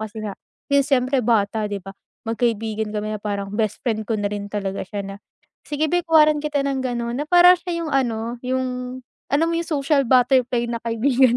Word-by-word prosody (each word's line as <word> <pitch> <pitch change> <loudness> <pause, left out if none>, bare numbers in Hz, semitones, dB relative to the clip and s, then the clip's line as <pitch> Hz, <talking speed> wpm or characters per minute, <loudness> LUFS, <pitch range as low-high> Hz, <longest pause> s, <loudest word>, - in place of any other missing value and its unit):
kasi 220 0 -6
nga 205 - -3 0.4
yung 280 - +5
siyempre 265 0 +1
bata, 215 -2 +1
'di 205 - -2
ba, 195 - -8 0.3
magkaibigan 225 -2 -1
kami 215 +1 -3
na 210 - -6
parang 200 -1 -3
best 215 -1 -1
friend 220 -2 0
ko 225 - +1
na 205 - -1
rin 205 0 -4
talaga 200 -1 -3
siya 205 -1 -4
na, 195 0 -7 0.5
sige 295 +1 0
beh, 355 - +3
kuhanan 305 -2 +5
kita 295 -2 -1
ng 275 -1 -1
gano'n 240 -2 -2
na - - -3
parang 355 +1 +8
siya 340 -2 -3
yung 310 - -4
ano 235 -2 -1
yung 255 0 -3 0.3
alam 320 +4 +3
mo 335 - -1
yung 335 - -2
social 280 -2 +1
butterfly 250 -1 +3
na 235 - -2
kaibigan 245 +2 +3
245 Hz, 200 wpm, -22 LUFS, 215-275 Hz, 0.5 s, parang